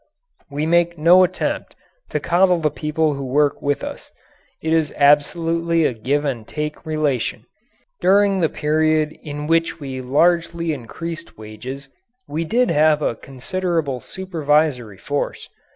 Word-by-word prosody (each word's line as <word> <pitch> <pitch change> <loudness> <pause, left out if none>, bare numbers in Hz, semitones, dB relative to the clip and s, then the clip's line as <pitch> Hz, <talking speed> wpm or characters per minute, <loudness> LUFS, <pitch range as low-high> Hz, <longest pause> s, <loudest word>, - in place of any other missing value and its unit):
We 145 +2 -2
make 170 +1 +2
no 175 +4 +6
attempt 180 - -2 0.3
to - - -1
coddle 180 +1 +3
the 155 -3 0
people 155 +1 0
who 140 0 -5
work 145 +2 +1
with 145 0 -1
us. - - -7 0.5
It 160 0 -1
is 160 -2 +2
absolutely 165 +3 +3
a - - +1
give 140 +7 -1
and 120 -6 -3
take 150 +1 -5
relation. 150 -6 -1 0.5
During 195 0 +4
the 165 -3 +2
period 155 0 +1
in 150 -1 -6
which 165 +1 +1
we 135 -3 -5
largely 170 +4 +1
increased 165 +6 -7
wages 125 +6 -8 0.4
we 155 +3 -2
did 240 +5 +2
have 155 -1 +3
a - - +1
considerable 140 +2 -3
supervisory 150 - -1
force. 145 +8 -3
155 Hz, 135 wpm, -21 LUFS, 140-170 Hz, 0.5 s, no